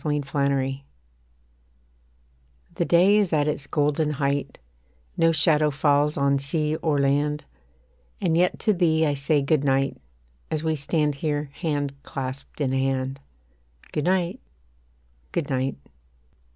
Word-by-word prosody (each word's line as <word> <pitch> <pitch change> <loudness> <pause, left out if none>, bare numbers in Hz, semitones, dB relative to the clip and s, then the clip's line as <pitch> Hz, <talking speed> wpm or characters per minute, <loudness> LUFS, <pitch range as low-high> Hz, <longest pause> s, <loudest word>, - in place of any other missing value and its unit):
GOOD 145 -3 -2
NIGHT 140 -1 0 1.9
The - - -1
day 185 +4 +5
is 205 -4 +2
at 150 -2 +2
its 150 -2 -2
golden 150 +1 +1
height, 140 0 -2 0.6
No 165 0 +3
shadow 155 -1 +3
falls 145 +1 +2
on 140 0 +2
sea 150 +2 +1
or 155 -3 0
land; 145 +2 +1 0.7
And 165 -3 +1
yet 180 +2 +2
to 215 - +3
thee 160 -3 +2
I 145 - +1
say 145 +1 +1
Good 145 0 +1
night, 135 0 0 0.5
As 155 0 -2
we 160 -1 0
stand 150 +1 0
here 145 0 -3
hand 145 -5 -2
clasped 135 +1 -6
in 135 -2 +1
hand, 135 0 -1 0.7
Good 150 - -2
night 180 -1 0 0.9
Good 145 - -2
night. 130 +1 -1
145 Hz, 130 wpm, -24 LUFS, 140-160 Hz, 1.9 s, day